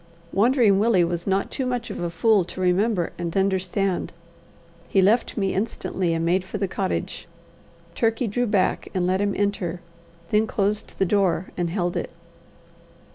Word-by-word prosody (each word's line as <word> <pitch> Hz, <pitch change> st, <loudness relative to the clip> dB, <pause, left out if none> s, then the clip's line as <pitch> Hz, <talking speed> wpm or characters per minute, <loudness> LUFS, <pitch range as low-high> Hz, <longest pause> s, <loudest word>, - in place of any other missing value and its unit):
Wandering 220 Hz, -2 st, +4 dB
Willie 210 Hz, -4 st, +4 dB
was 170 Hz, +1 st, -2 dB
not 195 Hz, 0 st, 0 dB
too 265 Hz, -, -2 dB
much 245 Hz, -1 st, -3 dB
a 175 Hz, -, -3 dB
fool 200 Hz, +4 st, +3 dB
to 180 Hz, -, -8 dB
remember 185 Hz, 0 st, +1 dB
and 170 Hz, +1 st, -3 dB
understand. 190 Hz, 0 st, 0 dB, 0.8 s
He 195 Hz, -, +2 dB
left 215 Hz, +7 st, +3 dB
me 195 Hz, -2 st, 0 dB
instantly, 190 Hz, -4 st, -1 dB
and 165 Hz, 0 st, -1 dB
made 180 Hz, +2 st, +2 dB
for 190 Hz, -, -6 dB
the 195 Hz, -, -1 dB
cottage. 190 Hz, 0 st, -3 dB, 0.7 s
Turkey 225 Hz, +1 st, +1 dB
drew 245 Hz, +3 st, 0 dB
back 205 Hz, -3 st, +1 dB
and 180 Hz, -1 st, +1 dB
let 185 Hz, +2 st, +1 dB
him 200 Hz, -1 st, 0 dB
enter, 200 Hz, -4 st, -1 dB, 0.5 s
then 215 Hz, +1 st, +3 dB
closed 205 Hz, 0 st, -1 dB
the 195 Hz, -, +2 dB
door, 185 Hz, -2 st, +1 dB
and 175 Hz, -1 st, -1 dB
held 175 Hz, -1 st, -1 dB
it. -, -, -3 dB
195 Hz, 160 wpm, -24 LUFS, 180-210 Hz, 0.8 s, Wandering